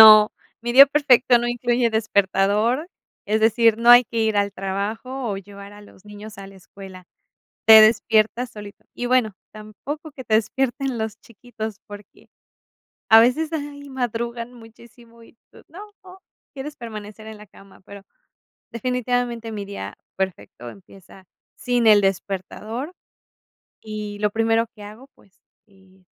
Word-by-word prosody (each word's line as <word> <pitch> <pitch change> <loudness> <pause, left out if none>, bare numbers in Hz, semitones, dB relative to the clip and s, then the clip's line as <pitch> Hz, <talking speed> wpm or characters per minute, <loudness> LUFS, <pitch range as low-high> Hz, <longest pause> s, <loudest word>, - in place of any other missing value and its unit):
No, 215 -1 +9 0.3
mi 240 - -3
día 275 +3 +9
perfecto 265 -4 +3
no 240 - -3
incluye 240 -1 0
despertador, 215 - 0 0.4
es 215 +1 0
decir, 225 0 +3
no 235 +1 +4
hay 245 0 +9
que 230 - -6
ir 220 -1 0
al 200 0 0
trabajo 215 +7 -4
o 200 - -3
llevar 200 +1 -12
a 205 - -14
los 205 -1 -19
niños 210 0 -12
a 195 - -9
la 195 - -15
escuela, 190 -1 -13 0.6
te 220 -1 +10
despiertas 225 +2 +2
solito. 205 -1 -12
Y 245 - -4
bueno, 245 -4 +1 0.2
tampoco 260 +9 -9
que 260 -2 -10
te 220 - +1
despierten 260 +3 -1
los 220 -1 -4
chiquitos, 220 -2 -9
porque 205 0 -14 0.8
a 220 - +9
veces, 300 +7 +1
ay, 285 -2 -6
madrugan 235 -1 -4
muchísimo, 235 0 -17
y 230 - -21
tú: - - -18
"No", 355 +6 -11 0.7
quieres 285 +2 -8
permanecer 215 -2 -10
en 220 - -9
la 210 - -14
cama, 195 0 -19
pero 200 0 -12 0.7
definitivamente 245 -1 -2
mi 205 -2 -5
día 105 - -8 0.2
perfecto 140 - -5
empieza 195 0 -17 0.3
sin 245 -2 -1
el 210 -2 +7
despertador, 200 - -4 0.9
y 210 -1 -7
lo 210 0 +1
primero 225 +1 +1
que 210 - -12
hago, 215 +6 -12
pues, 195 +1 -27 0.3
eh, 190 -2 -25
220 Hz, 145 wpm, -22 LUFS, 205-245 Hz, 0.9 s, te